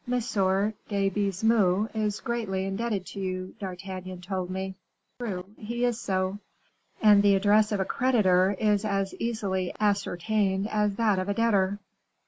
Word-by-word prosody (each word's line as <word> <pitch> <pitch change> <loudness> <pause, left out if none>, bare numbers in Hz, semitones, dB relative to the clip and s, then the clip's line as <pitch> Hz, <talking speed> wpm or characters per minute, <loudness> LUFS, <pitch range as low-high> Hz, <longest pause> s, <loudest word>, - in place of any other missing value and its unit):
de 200 -3 0
Baisemeaux 200 0 +2
is 210 -2 -1
greatly 210 -5 -2
indebted 195 0 -2
to 200 - -8
you, 185 -1 -4
D'Artagnan 185 -1 -6
told 185 0 -4
me." 190 +1 -4 0.5
"True, 190 -7 -4
he 235 +3 -2
is 240 -2 0
so." 190 +1 -1 0.6
"And 210 -2 +7
the 200 -1 +5
address 210 +2 +3
of 205 - 0
a 190 - +1
creditor 200 -6 +3
is 210 -1 +2
as 195 -2 -1
easily 195 -6 -1
ascertained 200 -1 0
as 210 -2 +1
that 210 -3 +2
of 185 +2 -3
a 200 - 0
debtor." 205 -4 +2
200 Hz, 140 wpm, -27 LUFS, 190-215 Hz, 0.6 s, And